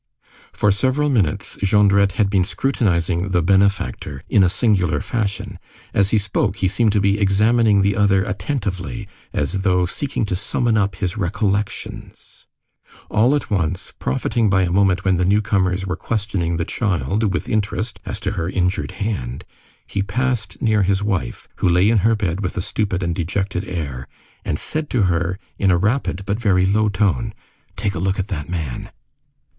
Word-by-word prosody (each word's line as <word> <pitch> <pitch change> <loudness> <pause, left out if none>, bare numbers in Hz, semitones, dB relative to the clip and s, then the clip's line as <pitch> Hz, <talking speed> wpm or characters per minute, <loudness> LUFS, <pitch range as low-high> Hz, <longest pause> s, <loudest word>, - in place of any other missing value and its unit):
For 105 - +2
several 130 +8 +1
minutes, 100 - 0
Jondrette 100 -1 +4
had 105 +1 +2
been 100 -2 +2
scrutinizing 90 -6 0
"the 90 -3 +1
benefactor" 95 -7 +1
in 105 - +4
a 90 - +5
singular 95 -5 +1
fashion. 105 -2 -3 0.3
As 100 -1 +3
he 110 - +3
spoke, 100 -1 0
he 95 -2 0
seemed 110 +3 +2
to 105 - +3
be 100 +1 +2
examining 105 +1 +3
the 100 0 +2
other 100 -2 +3
attentively, 105 -1 -3 0.2
as 85 +7 -1
though 90 -2 +2
seeking 115 +5 -2
to 95 - -2
summon 110 +4 0
up 100 -3 +1
his 95 +3 -3
recollections. 100 +1 -3 0.6
All 120 +7 +4
at 145 - -3
once, 90 -2 -1
profiting 105 - 0
by 95 -1 +3
a 85 - 0
moment 95 -1 +2
when 95 -2 +3
the 90 - +1
newcomers 95 -1 +1
were 90 - -2
questioning 100 -6 -2
the 85 - -1
child 100 - 0
with 90 - -2
interest 110 +2 -1
as 105 - -5
to 95 - -1
her 85 -4 -2
injured 90 -1 -1
hand, 70 - -4 0.4
he 100 - -2
passed 105 -1 -2
near 110 -2 +3
his 100 +1 +1
wife, 100 -4 -2
who - - +2
lay 90 +3 +4
in 110 -1 +4
her 110 +4 +3
bed 95 -4 -2
with 95 +2 -3
a - - +1
stupid 95 -1 -1
and 85 -1 0
dejected 95 +3 -2
air, 70 -8 -4 0.4
and 75 - -2
said 155 - -3
to 120 -5 +1
her 90 0 0 0.2
in 100 - +3
a 90 - +4
rapid 105 -1 0
but 100 +2 -1
very 95 -4 +3
low 105 +2 +2
tone:— 105 +3 0 0.4
"Take 100 - -1
a - - -4
look 95 +2 0
at 95 +2 -3
that 80 -6 -4
man!" 80 -8 -4
100 Hz, 175 wpm, -20 LUFS, 90-105 Hz, 0.6 s, a